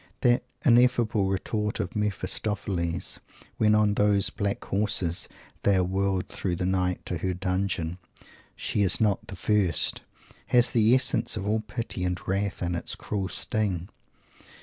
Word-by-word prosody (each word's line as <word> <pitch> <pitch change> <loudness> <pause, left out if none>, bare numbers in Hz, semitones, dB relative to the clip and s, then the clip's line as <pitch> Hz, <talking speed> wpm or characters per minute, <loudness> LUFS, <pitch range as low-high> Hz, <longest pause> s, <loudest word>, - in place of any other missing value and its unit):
That 120 -1 +4 0.2
ineffable 120 -5 +4
retort 105 +2 -2
of - - -3
Mephistopheles, 100 -4 -2 0.4
when, 105 -1 +4
on 105 -1 +3
those 100 -1 +3
"black 100 -2 -2
horses," 100 -4 +1 0.3
they 100 - +3
are 95 - +3
whirled 95 0 0
through 90 -3 -3
the 90 +1 -2
night 90 -1 0
to 90 - -3
her 90 +1 -1
dungeon, 90 -2 -2 0.6
"She 105 - -1
is 95 -3 +3
not 105 -3 +1
the 95 - -7
first," 95 -4 +1 0.5
has 120 -1 +4
the 115 0 +5
essence 130 -3 +1
of 100 -1 -3
all 110 +1 +2
pity 110 -3 -4
and 90 0 -1
wrath 100 0 -1
in 90 0 -1
its 85 - -3
cruel 100 -2 -3
sting. 100 -5 -1
100 Hz, 150 wpm, -27 LUFS, 90-105 Hz, 0.6 s, the